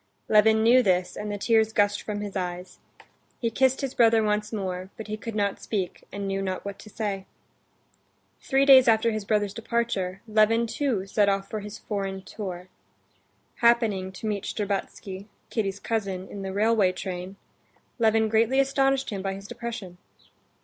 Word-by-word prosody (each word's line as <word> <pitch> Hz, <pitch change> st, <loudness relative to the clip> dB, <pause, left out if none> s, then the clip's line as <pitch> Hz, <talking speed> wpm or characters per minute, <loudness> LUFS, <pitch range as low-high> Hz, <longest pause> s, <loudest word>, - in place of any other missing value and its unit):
Levin 220 Hz, +1 st, +5 dB
knew 245 Hz, +3 st, +6 dB
this, 185 Hz, -5 st, +1 dB
and 210 Hz, 0 st, -4 dB
the 205 Hz, -, -3 dB
tears 220 Hz, +1 st, +2 dB
gushed 205 Hz, -1 st, +2 dB
from 205 Hz, -1 st, -4 dB
his 205 Hz, -1 st, -6 dB
eyes. 180 Hz, -1 st, -4 dB, 0.6 s
He 230 Hz, -2 st, -1 dB
kissed 265 Hz, +2 st, +2 dB
his 275 Hz, -2 st, -3 dB
brother 225 Hz, -2 st, +4 dB
once 210 Hz, 0 st, 0 dB
more, 185 Hz, -3 st, -4 dB
but 220 Hz, -, -7 dB
he 215 Hz, -, -4 dB
could 220 Hz, +1 st, -7 dB
not 200 Hz, -2 st, 0 dB
speak, 190 Hz, -5 st, -3 dB
and 200 Hz, 0 st, -4 dB
knew 195 Hz, 0 st, -1 dB
not 190 Hz, 0 st, -3 dB
what 200 Hz, -1 st, -6 dB
to 215 Hz, -, -12 dB
say. 200 Hz, -3 st, -4 dB, 1.1 s
Three 270 Hz, 0 st, +2 dB
days 265 Hz, -2 st, +8 dB
after 225 Hz, 0 st, +4 dB
his 215 Hz, -2 st, -3 dB
brother's 205 Hz, -2 st, +1 dB
departure, 230 Hz, -5 st, -2 dB
Levin 220 Hz, +2 st, +3 dB
too 230 Hz, -5 st, -1 dB
set 200 Hz, +1 st, +2 dB
off 195 Hz, 0 st, -1 dB
for 215 Hz, -, -2 dB
his 210 Hz, +1 st, -8 dB
foreign 195 Hz, -2 st, -4 dB
tour. 185 Hz, -4 st, -7 dB, 0.9 s
Happening 225 Hz, -6 st, +2 dB
to 190 Hz, -, -8 dB
meet 205 Hz, -2 st, -2 dB
Shtcherbatsky, 200 Hz, -1 st, -4 dB, 0.2 s
Kitty's 200 Hz, -3 st, -1 dB
cousin, 195 Hz, -5 st, -3 dB
in 200 Hz, -, -7 dB
the 190 Hz, 0 st, -4 dB
railway 210 Hz, -1 st, +3 dB
train, 185 Hz, 0 st, -6 dB, 0.6 s
Levin 220 Hz, -1 st, +3 dB
greatly 225 Hz, +4 st, +2 dB
astonished 270 Hz, -1 st, +2 dB
him 200 Hz, -2 st, -3 dB
by 195 Hz, 0 st, -2 dB
his 195 Hz, +1 st, -10 dB
depression. 210 Hz, -8 st, -7 dB
210 Hz, 170 wpm, -26 LUFS, 195-225 Hz, 1.1 s, days